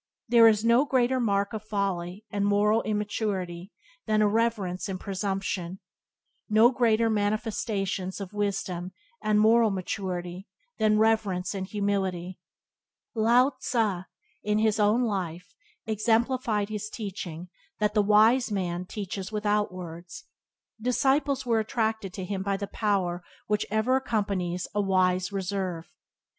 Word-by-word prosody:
There 235 Hz, -1 st, +7 dB
are 220 Hz, -, +7 dB
no 235 Hz, +3 st, +5 dB
greater 260 Hz, -2 st, +1 dB
marks 200 Hz, -3 st, 0 dB
of 215 Hz, -1 st, -5 dB
folly 200 Hz, -2 st, -3 dB
and 200 Hz, 0 st, -1 dB
moral 205 Hz, +2 st, +3 dB
immaturity 205 Hz, -4 st, -3 dB, 0.4 s
than 215 Hz, 0 st, +3 dB
irreverence 210 Hz, -4 st, 0 dB
and 185 Hz, -1 st, -4 dB
presumption; 195 Hz, -2 st, -3 dB, 0.7 s
no 220 Hz, +3 st, +6 dB
greater 230 Hz, -3 st, +2 dB
manifestations 205 Hz, -3 st, -1 dB
of 200 Hz, 0 st, -7 dB
wisdom 185 Hz, -3 st, -2 dB, 0.3 s
and 210 Hz, 0 st, +2 dB
moral 225 Hz, +1 st, +5 dB
maturity 185 Hz, -1 st, -4 dB, 0.3 s
than 215 Hz, -1 st, +3 dB
reverence 215 Hz, -5 st, +1 dB
and 190 Hz, -1 st, -4 dB
humility. 190 Hz, -3 st, -2 dB, 0.7 s
Lao 240 Hz, +3 st, +4 dB
Tze, 205 Hz, -7 st, -1 dB, 0.3 s
in 210 Hz, 0 st, 0 dB
his 215 Hz, -1 st, +2 dB
own 210 Hz, +4 st, +3 dB
life, 180 Hz, -5 st, -3 dB, 0.3 s
exemplified 225 Hz, 0 st, +1 dB
his 215 Hz, 0 st, -4 dB
teaching 180 Hz, -6 st, -6 dB, 0.3 s
that 210 Hz, 0 st, 0 dB
the 210 Hz, -, +4 dB
wise 220 Hz, +4 st, +4 dB
man 180 Hz, -3 st, -2 dB
"teaches 195 Hz, -1 st, -5 dB
without 210 Hz, -1 st, 0 dB
words." 175 Hz, -, -9 dB, 0.6 s
Disciples 270 Hz, +3 st, +1 dB
were 230 Hz, -2 st, +2 dB
attracted 220 Hz, -2 st, -1 dB
to 190 Hz, -, -5 dB
him 195 Hz, 0 st, -3 dB
by 195 Hz, 0 st, -1 dB
the 200 Hz, -, -3 dB
power 190 Hz, -5 st, -1 dB, 0.2 s
which 210 Hz, 0 st, 0 dB
ever 220 Hz, +5 st, +2 dB
accompanies 200 Hz, -8 st, -2 dB
a 205 Hz, -, +1 dB
wise 185 Hz, -1 st, +1 dB
reserve. 190 Hz, -3 st, -3 dB
205 Hz, 125 wpm, -27 LUFS, 185-220 Hz, 0.7 s, There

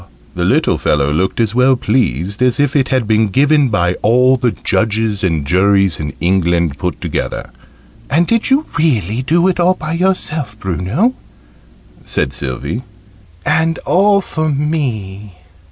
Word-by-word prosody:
the -, -, -3 dB
little -, -, +1 dB
fellow 75 Hz, -1 st, +1 dB
looked 95 Hz, +8 st, -1 dB
as 115 Hz, -2 st, +1 dB
well 130 Hz, +2 st, +4 dB
pleased 105 Hz, -, -1 dB
as 125 Hz, +2 st, +2 dB
if 145 Hz, -1 st, +1 dB
it 135 Hz, -2 st, +2 dB
had 130 Hz, -3 st, +1 dB
been 110 Hz, 0 st, +2 dB
given 140 Hz, +5 st, +2 dB
by 90 Hz, -5 st, +1 dB
all 125 Hz, +4 st, +4 dB
the 125 Hz, -1 st, 0 dB
judges 110 Hz, -2 st, -1 dB
and 80 Hz, -6 st, 0 dB
juries 95 Hz, +2 st, +2 dB
in 75 Hz, -2 st, -4 dB
England 85 Hz, -4 st, 0 dB
put 90 Hz, -6 st, -3 dB
together. -, -, -4 dB, 0.6 s
"And 165 Hz, +5 st, +2 dB
did 230 Hz, +4 st, 0 dB
you 280 Hz, +4 st, +2 dB
really 120 Hz, -, 0 dB
do 170 Hz, +7 st, +2 dB
it 185 Hz, -1 st, 0 dB
all 180 Hz, +2 st, +3 dB
by 155 Hz, -1 st, -5 dB
yourself, 160 Hz, -, -1 dB
Bruno?" 95 Hz, -, -1 dB, 0.9 s
said -, -, -1 dB
Sylvie. 70 Hz, -, -4 dB, 0.6 s
"And 165 Hz, +1 st, +1 dB
all 200 Hz, +2 st, +3 dB
for 155 Hz, -4 st, -3 dB
me?" 115 Hz, -, -3 dB
115 Hz, 150 wpm, -15 LUFS, 95-155 Hz, 0.9 s, well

